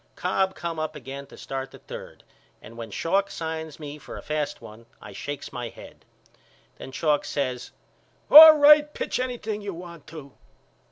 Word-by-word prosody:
Cobb 190 +1 -1
come 165 0 -5
up 155 0 -4
again 140 0 -9
to - - -15
start 135 0 -6
the - - -14
third - - -11 0.4
and 115 +2 -14
when 115 -1 -8
Schalk 195 +4 -1
signs 160 -3 -6
me 150 -1 -8
for - - -10
a - - -10
fast 150 -1 -3
one 110 +2 -14
I 105 - -12
shakes 145 +7 -7
my 120 -2 -5
head. - - -15 0.7
Then 130 - -9
Schalk 150 +1 0
says 130 -3 -3 0.6
All 310 +1 +12
right 295 0 +6
pitch - - -3
anything 235 -4 -4
you 200 -3 -6
want 170 -3 -11
to. 150 -3 -11
155 Hz, 170 wpm, -25 LUFS, 135-195 Hz, 0.7 s, All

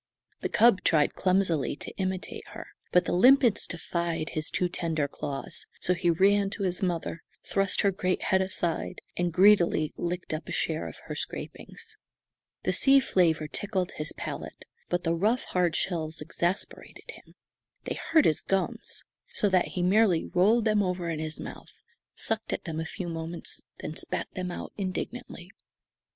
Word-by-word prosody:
The - - -2
cub 225 -5 +5
tried 150 -3 +3
clumsily 185 -8 +1
to - - -7
imitate 185 -1 -3
her, - - -7 0.3
but 180 -1 +4
the - - -1
limpets 245 +4 +5
defied 170 -2 -2
his 155 -1 -2
too 180 - +1
tender 165 -4 -1
claws, 140 -1 -4
so 180 - +2
he 175 0 +1
ran 195 +4 +4
to 200 - -3
his 180 +1 -1
mother, 170 -3 -2 0.2
thrust 195 -1 +1
her 200 - +3
great 185 -1 -1
head 190 0 +3
aside, 175 -3 -2
and 175 0 0
greedily 180 -4 +5
licked 175 -1 -3
up 155 0 -4
a - - -6
share 160 -1 -1
of - - -9
her - - -5
scrapings. - - -6 0.7
The - - +1
sea 275 0 +6
flavour 165 - +2
tickled 190 +2 -2
his 150 0 -3
palate, - - -6 0.2
but 175 0 0
the 165 - +1
rough, 215 +8 +1
hard 175 -3 +1
shells 160 -3 -2
exasperated 175 +5 -3
him. - - -16 0.5
They - - -3 0.2
hurt 320 -2 +5
his 155 - +3
gums, 195 0 -2 0.3
so 205 - +3
that 185 -2 +3
he 180 - -2
merely 185 -2 +4
rolled 215 +6 +3
them 215 -1 +3
over 180 -3 -1
in 155 - -3
his 155 0 -4
mouth, - - -9 0.4
sucked 225 0 -2
at - - -3
them 160 -2 -4
a 160 - -2
few 180 +2 -5
moments, 165 0 -4 0.2
then 155 - -5
spat - - -3
them 185 -1 -3
out 175 - -6
indignantly. 190 -1 -5
180 Hz, 165 wpm, -28 LUFS, 165-195 Hz, 0.7 s, sea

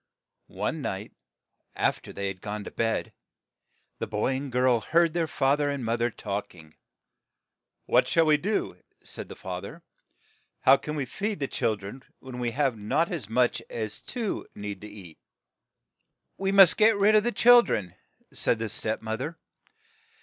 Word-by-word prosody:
One - - -3
night, - - -4 0.6
aft - - 0
er - - -8
they 100 - -4
had 95 -1 -6
gone 105 0 -5
to - - -8
bed, 115 -1 -1 0.9
the - - -3
boy 105 +5 0
and 135 0 -4
girl 125 -1 +3
heard 165 +7 +2
their 170 -2 0
fa 135 -2 +2
ther 145 -1 0
and 140 -4 -3
moth 115 +1 -1
er 120 - +2
talk 100 -4 -5
ing. 80 -3 -15 1.1
"What - - +3
shall 165 -1 +3
we 155 -1 +5
do?" 205 +8 -2 0.3
said - - -7
the - - -8
fa 90 -1 -6
ther. 100 - -7
1 165 - -15 0.4
' - - -37
How 135 +1 +7
can 150 +2 -5
we 145 -3 -2
feed 205 - -3
the 140 - -1
chil 110 - 0
dren 100 +6 -9 0.2
when 130 -2 -8
we 120 -1 0
have 135 0 0
not 110 +11 0
as 145 - -4
much 125 +2 +2
as 110 -2 -3
two 235 -5 -4
need 100 -2 -6
to 105 - -8
eat? 95 -6 -12 0.4
' - - -56
' - - -53
"We 195 0 0
must 195 -3 +7
get 220 0 +5
rid 205 +2 +4
of 215 -1 +5
the 240 - 0
chil 245 +2 +7
dren," 95 - -3 0.4
said 115 - +1
the 110 0 -3
step 110 +1 -3
moth 110 +2 -3
er. 160 +4 -4
125 Hz, 195 wpm, -27 LUFS, 105-165 Hz, 1.1 s, How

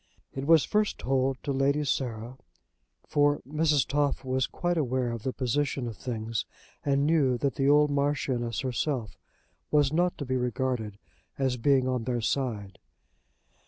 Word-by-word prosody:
It 135 +1 -4
was 165 -2 +6
first 210 0 0
told 135 0 0
to 140 - -2
Lady 140 +2 +1
Sarah, 125 -2 -3 0.7
for 145 0 +2
Mrs. 150 -2 +2
Toff 145 -1 0
was 130 0 0
quite 175 0 -1
aware 130 -5 0
of 115 -1 -5
the 130 - -2
position 130 0 -1
of 115 - -6
things, 115 -2 -3 0.4
and 140 0 +2
knew 145 -6 +3
that 140 +2 0
the 135 0 +1
old 150 0 +5
Marchioness 140 -5 0
herself 125 -4 -2 0.5
was 145 -1 +3
not 175 +2 +1
to 145 - -4
be 130 0 0
regarded 125 -4 -2 0.4
as 130 -2 +1
being 130 +1 +3
on 125 -3 -1
their 120 -1 -1
side. 110 -5 -2
135 Hz, 155 wpm, -28 LUFS, 125-145 Hz, 0.7 s, was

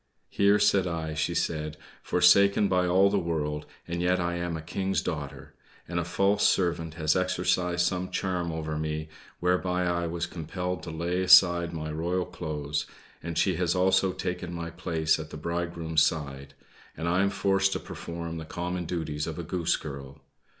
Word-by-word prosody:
"Here 100 +1 +4
sit 100 -2 +3
I," 80 -2 -3
she 80 +3 -1
said 75 -2 -2 0.2
"forsaken 100 +3 +5
by 90 -1 +2
all 95 +3 +4
the 100 - +2
world, 75 -3 -2 0.2
and 85 0 -3
yet 90 +1 +2
I 85 0 -1
am 85 -1 -2
a - - -6
King's 95 +3 -1
daughter; 70 -3 -5 0.3
and 85 0 -2
a - - 0
false 100 +4 +1
servant 85 -5 +1
has 80 -2 +1
exercised 90 -1 +1
some 90 0 -1
charm 90 -3 -2
over 80 -1 -3
me, 80 0 -3 0.3
whereby 90 0 +1
I 85 -1 0
was 85 +1 -2
compelled 90 +2 -4
to - - -7
lay 85 +3 -1
aside 90 -2 +6
my 80 -2 -4
royal 85 +4 -1
clothes; 75 -2 -4 0.3
and 85 -1 -5
she 95 -4 +2
has 90 0 +1
also 95 +1 +3
taken 90 -1 -4
my 85 0 -5
place 80 -2 0
at 80 - -7
the - - -8
bridegroom's 85 0 -1
side, 70 -3 -1 0.4
and 80 - -3
I 90 +2 +2
am 100 - +3
forced 95 0 +2
to - - -2
perform 85 0 -6
the 80 - -6
common 90 +2 -4
duties 75 -3 -3
of 80 - -5
a 85 - -4
Goose 85 0 0
Girl. 70 -1 -8
85 Hz, 180 wpm, -28 LUFS, 80-90 Hz, 0.4 s, aside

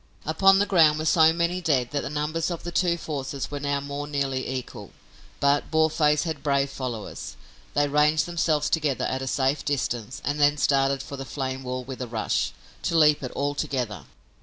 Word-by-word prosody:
Upon 195 +5 +5
the 200 - +3
ground 160 -6 +4
were 155 - -3
so 160 0 +5
many 170 +2 -1
dead 135 -7 +1
that 145 -1 -1
the - - -4
numbers 150 +3 -1
of 170 -2 -5
the 175 - -5
two 175 -1 +1
forces 140 -4 -4
were 145 - -3
now 140 0 -1
more 140 +1 -5
nearly 135 -3 -2
equal. 125 -5 -6 0.5
But 140 +1 +2
Boarface 155 -1 +2
had 160 -4 -4
brave 140 -1 +1
followers. 120 -6 -6 0.4
They 145 0 +3
ranged 150 +2 +3
themselves 160 -4 0
together 150 -5 0
at 130 - -2
a 135 - -4
safe 135 +2 0
distance 125 -4 -2
and 145 +1 -1
then 145 0 +4
started 135 -1 +2
for 140 - -8
the 135 - -5
flame 130 0 -4
wall 130 0 -4
with 130 0 -8
a 125 - -3
rush, 115 -2 -1 0.3
to 165 - 0
leap 150 -2 +5
it 130 - -4
all 145 +1 -1
together. 125 -7 -3
145 Hz, 195 wpm, -25 LUFS, 135-155 Hz, 0.5 s, Upon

